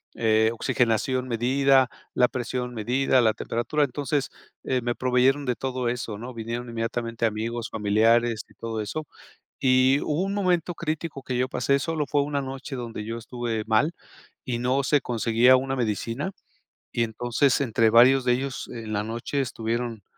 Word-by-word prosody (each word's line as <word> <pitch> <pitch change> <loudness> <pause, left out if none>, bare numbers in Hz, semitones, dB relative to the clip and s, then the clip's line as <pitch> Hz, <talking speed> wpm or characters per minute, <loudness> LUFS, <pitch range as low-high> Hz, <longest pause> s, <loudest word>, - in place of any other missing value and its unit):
eh, 110 -1 +3
oxigenación 120 +2 0
medida, 130 +2 +3 0.2
la 125 - +4
presión 125 0 -4
medida, 125 +4 +2
la 110 -2 +3
temperatura. 120 +7 -1
Entonces, 145 +1 -1 0.3
eh, 130 - 0
me 120 0 -1
proveyeron 130 +3 +2
de 125 - +1
todo 130 -1 -2
eso, 115 -3 -4
¿no? 125 +2 -8
Vinieron 115 +2 -5
inmediatamente 115 0 -2
amigos, 115 +2 -2
familiares 110 +2 +2
y - - -21
todo 115 -1 -5
eso. 130 +9 -4 0.5
Y 130 +1 +4
hubo 150 +3 -1
un 195 +1 -2
momento 180 -3 0
crítico 155 -3 -4
que 130 - -3
yo 125 - +1
pasé. 140 +1 +1
Solo 160 0 -1
fue 145 - +2
una 145 -1 -2
noche 135 +1 -6
donde 115 -4 -5
yo 115 +1 -4
estuve 115 -1 -4
mal, 115 +10 +2 0.5
y 125 -4 -2
no 130 +3 +1
se 145 +1 +2
conseguía 115 +2 +4
una 135 +1 -2
medicina. 115 - -2 0.6
Y 120 - +1
entonces, 120 +5 +1
entre 115 -2 +2
varios 125 +3 +6
de 125 - +3
ellos, 135 +1 -4
en 110 -2 -7
la 105 0 -1
noche 115 +5 -3
estuvieron, 115 -2 -3
125 Hz, 165 wpm, -25 LUFS, 115-135 Hz, 0.6 s, varios